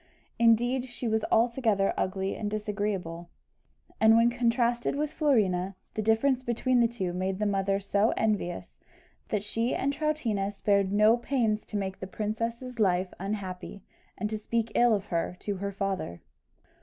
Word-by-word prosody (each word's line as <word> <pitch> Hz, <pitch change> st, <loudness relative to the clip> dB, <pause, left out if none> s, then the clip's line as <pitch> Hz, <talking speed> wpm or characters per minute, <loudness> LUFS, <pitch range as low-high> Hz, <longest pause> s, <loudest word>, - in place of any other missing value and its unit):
Indeed, 240 Hz, +2 st, +3 dB
she 245 Hz, -1 st, -5 dB
was 220 Hz, -1 st, +1 dB
altogether 225 Hz, -4 st, +2 dB
ugly 190 Hz, +1 st, -1 dB
and 210 Hz, -, -3 dB
disagreeable; 205 Hz, -5 st, -3 dB, 0.7 s
and 220 Hz, 0 st, +6 dB
when 235 Hz, +1 st, +4 dB
contrasted 240 Hz, +1 st, +1 dB
with 300 Hz, +1 st, -2 dB
Florina, 195 Hz, -, +1 dB, 0.2 s
the 215 Hz, -, -2 dB
difference 225 Hz, +5 st, +2 dB
between 250 Hz, +1 st, +1 dB
the 235 Hz, -, +5 dB
two 195 Hz, -7 st, -3 dB
made 185 Hz, +1 st, -2 dB
the 210 Hz, -, -1 dB
mother 195 Hz, -1 st, +1 dB
so 200 Hz, +3 st, +1 dB
envious, 205 Hz, -5 st, -2 dB, 0.5 s
that 210 Hz, -3 st, -1 dB
she 225 Hz, +3 st, -1 dB
and 280 Hz, +1 st, 0 dB
Troutina 255 Hz, -10 st, -1 dB
spared 200 Hz, -1 st, +1 dB
no 215 Hz, +3 st, +5 dB
pains 235 Hz, -4 st, 0 dB
to 210 Hz, -, -3 dB
make 190 Hz, -1 st, -3 dB
the 190 Hz, -, -6 dB
princess's 230 Hz, +4 st, -4 dB
life 185 Hz, -2 st, +2 dB
unhappy, 195 Hz, -1 st, -5 dB, 0.3 s
and 210 Hz, -, -1 dB
to 215 Hz, -, -2 dB
speak 230 Hz, +1 st, -1 dB
ill 240 Hz, -2 st, +4 dB
of 200 Hz, -1 st, -4 dB
her 170 Hz, +1 st, -1 dB
to 205 Hz, -2 st, -3 dB
her 200 Hz, +1 st, -3 dB
father. 195 Hz, -, -3 dB
215 Hz, 155 wpm, -28 LUFS, 195-235 Hz, 0.7 s, and